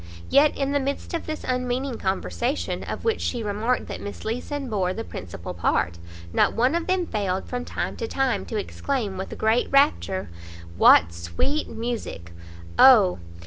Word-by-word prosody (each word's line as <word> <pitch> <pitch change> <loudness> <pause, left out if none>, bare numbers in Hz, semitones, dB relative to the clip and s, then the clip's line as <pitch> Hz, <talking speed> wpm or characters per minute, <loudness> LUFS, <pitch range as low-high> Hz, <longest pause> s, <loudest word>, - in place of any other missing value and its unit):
Yet, 290 +1 +5
in 275 0 0
the 285 - +2
midst 280 +4 -3
of 335 - -3
this 310 -1 -4
unmeaning 250 0 -2
conversation, 240 +7 -2
of - - -5
which 450 -1 +1
she 240 -3 -2
remarked 215 +4 0
that - - -7
Miss 205 - -7
Leeson 260 +5 -3
bore 190 -5 -1
the 225 - -4
principal 90 - -7
part, 85 0 0 0.3
not - - +3
one 250 +5 +3
of 340 0 -1
them 370 -1 +1
failed, 195 - -2
from 245 0 -4
time - - -3
to 460 - -3
time, 270 - 0
to 220 - -3
exclaim 220 -1 -2
with 190 +1 -6
great 220 +3 +2
rapture 95 - +2 0.4
"What 85 0 +6
sweet 85 - -2
music! 225 - -5 0.2
" 85 0 -15
"Oh! 210 - +7
235 Hz, 170 wpm, -24 LUFS, 190-275 Hz, 0.4 s, Oh